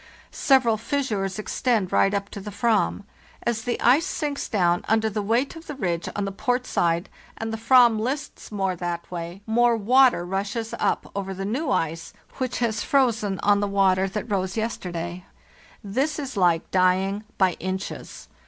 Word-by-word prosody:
Several 255 -5 +3
fissures 215 -6 -2
extend 215 -2 0
right 195 - +4
up 200 0 -2
to 205 - -7
the 210 - -7
Ayam. 210 0 +1 0.4
As 235 -2 -1
the 245 - -1
ice 285 +9 +4
sinks 295 -5 -3
down 175 -4 +2
under 220 0 +2
the 210 0 -2
weight 230 +9 0
of 325 0 -11
the 295 - -5
ridge 175 -9 -2
on 205 - -1
the 195 - -3
port 245 +5 -1
side 170 -4 0 0.3
and 225 0 -4
the - - -2
fram 235 -1 +5
lists 265 +4 -4
more 195 -3 -1
that 175 0 -4
way, 175 +2 -6
more 235 +1 +3
water 245 -3 +4
rushes 200 +5 -3
up - - 0
over 195 -1 -3
the 195 +1 -4
new 260 +8 -2
ice 165 -5 -1 0.3
which 255 -1 -1
has 220 -3 0
frozen 220 -8 +1
on 205 0 +4
the 205 - 0
water 195 -1 +2
that 210 +2 -4
rose 190 -1 -1
yesterday. 180 -5 -4 0.6
This 265 +10 -1
is 275 -4 -5
like 175 -3 +2
dying 190 +2 +2
by 185 -2 +3
inches. 190 +1 -5
205 Hz, 170 wpm, -24 LUFS, 190-240 Hz, 0.6 s, fram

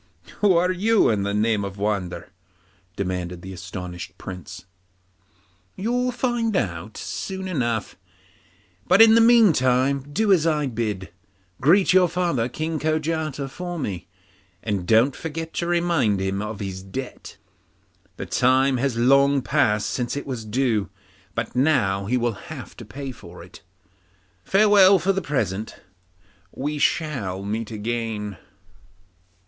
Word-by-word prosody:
'Who 195 -4 +4
are 180 +2 +2
you, 210 - +3
in 105 -2 0
the 100 +1 -1
name 105 0 +1
of 100 0 -6
wonder?' 95 -4 -3 0.6
demanded 90 -2 -4
the 95 0 -7
astonished 90 -1 -8
Prince. 90 -1 -9 1.1
'You'll 245 +5 0
find 240 -3 -1
out 90 - -3
soon 190 -1 -5
enough, 120 - -2 0.9
but 185 +2 +5
in 225 0 +9
the 230 - +6
meantime 140 - +4
do 205 +6 +3
as 165 -3 +2
I 150 -2 +1
bid 110 -6 -3
you. - - -10 0.5
Greet 180 +8 +4
your 185 -2 +5
father 165 -9 0
King 155 +4 -3
Kojata 155 -2 -1
from 175 +2 -5
me, 95 -4 -5 0.6
and 100 -4 -2
don't 115 +5 +4
forget 165 0 -6
to 170 - -2
remind 170 - +1
him 95 +1 -2
of 105 -1 -5
his 95 -2 -5
debt; 125 +7 -8 0.8
the - - -5
time 130 +1 +2
has 125 -1 -1
long 140 +2 +4
passed 110 -9 +1
since 125 +2 -2
it 145 - -5
was 125 -5 -5
due, 110 -2 0 0.5
but 115 +2 -3
now 120 -9 +2
he 125 +4 +1
will 115 -5 -3
have 150 -6 -8
to 120 - -9
pay 135 +5 -7
it. 90 -3 -13 0.8
Farewell 200 - +6
for 190 +3 +1
the 195 - -1
present; 110 - -2 0.8
we 145 +2 -4
shall 120 - -1
meet 110 +2 -3
again. 110 -2 -4
130 Hz, 135 wpm, -23 LUFS, 105-165 Hz, 1.1 s, in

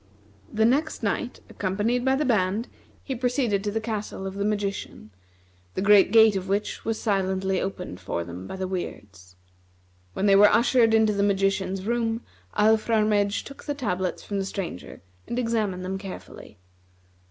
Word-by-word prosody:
The 220 0 +2
next 285 +7 +1
night, - - -2
accompanied 210 +6 -1
by 265 +1 +3
the 300 +2 0
band, 215 -1 +1 0.4
he 270 - -3
proceeded 245 -5 0
to 210 - -1
the 220 +2 -1
castle 215 -3 -4
of 190 - -4
the 200 +1 -3
magician, 200 - -3 0.6
the - - -1
great 200 -1 +6
gate 220 -2 +6
of 190 0 -3
which 200 +2 -2
was 225 0 -2
silently 190 -2 0
opened 180 - -5
for 95 -3 -3
them 90 +2 -8
by - - -6
the 190 0 -3
Weirds. 95 - -7 0.8
When 195 - -1
they 200 -1 +6
were 205 +1 +8
ushered 235 -1 +4
into 220 -1 +4
the 200 - 0
magician's 195 -1 0
room, 230 0 0 0.4
Alfrarmedj 215 -1 +2
took 275 - -12
the 290 - -2
tablets 185 -9 -2
from 200 -1 -3
the 195 - -2
Stranger 185 - -6 0.2
and 240 - -3
examined 215 -6 -1
them 190 +1 -3
carefully. 195 -1 -10
205 Hz, 165 wpm, -25 LUFS, 190-225 Hz, 0.8 s, were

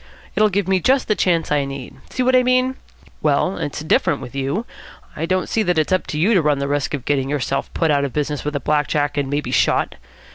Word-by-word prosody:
It'll 215 0 +4
give 200 -1 -1
me 190 -1 +3
just 260 +7 +2
the 215 - +3
chance 170 -6 +1
I 145 -1 +2
need. 135 -2 -7
See 255 - -1
what 255 +1 +3
I 255 - +6
mean? 255 +1 +2 0.5
Well, 155 +5 +1
it's 145 - -4
different 150 -2 +2
with 125 -2 -9
you. 140 - -2 0.5
I 165 +2 -3
don't 185 0 0
see 225 - 0
that 180 -5 +1
it's 155 +3 +2
up 185 - 0
to 150 - -4
you 190 +9 +3
to 185 - +4
run 150 -2 +2
the 140 0 -2
risk 145 0 -1
of 130 -3 -8
getting 135 -2 0
yourself 140 -1 -2
put 165 -2 +2
out 140 -1 +2
of 140 - -2
business 150 0 -2
with 150 0 -3
a - - 0
black 150 0 +1
jack, 145 -1 0
and 140 -2 -1
maybe 145 -3 -2
shot. 110 -5 +2
150 Hz, 250 wpm, -20 LUFS, 140-190 Hz, 0.5 s, I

